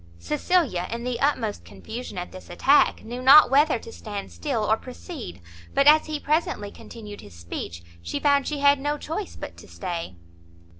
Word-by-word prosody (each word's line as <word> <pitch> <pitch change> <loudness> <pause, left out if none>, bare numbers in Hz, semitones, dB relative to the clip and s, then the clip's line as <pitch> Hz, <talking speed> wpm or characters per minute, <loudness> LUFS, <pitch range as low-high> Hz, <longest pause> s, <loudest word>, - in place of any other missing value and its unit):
Cecilia, 180 - 0
in 235 +1 -4
the 245 -1 -2
utmost 235 -7 0
confusion 225 -2 -8
at 180 - -5
this 185 - -12
attack, 270 +11 +3
knew 240 +3 -6
not 270 +1 +8
whether 290 +3 +4
to 460 - -11
stand 205 - -7
still 265 -8 -2
or 215 +1 +3
proceed; 250 - -9 0.3
but, 275 - +4
as 305 +2 +6
he 305 -1 -3
presently 295 -9 -1
continued 210 -3 -10
his 100 - -14
speech, 85 0 -7 0.2
she 85 0 -4
found 285 -1 +3
she 295 -2 -3
had 285 0 +5
no 290 +2 -1
choice 330 +7 -5
but - - -8
to - - -13
stay. 170 - -5
245 Hz, 180 wpm, -25 LUFS, 195-290 Hz, 0.3 s, not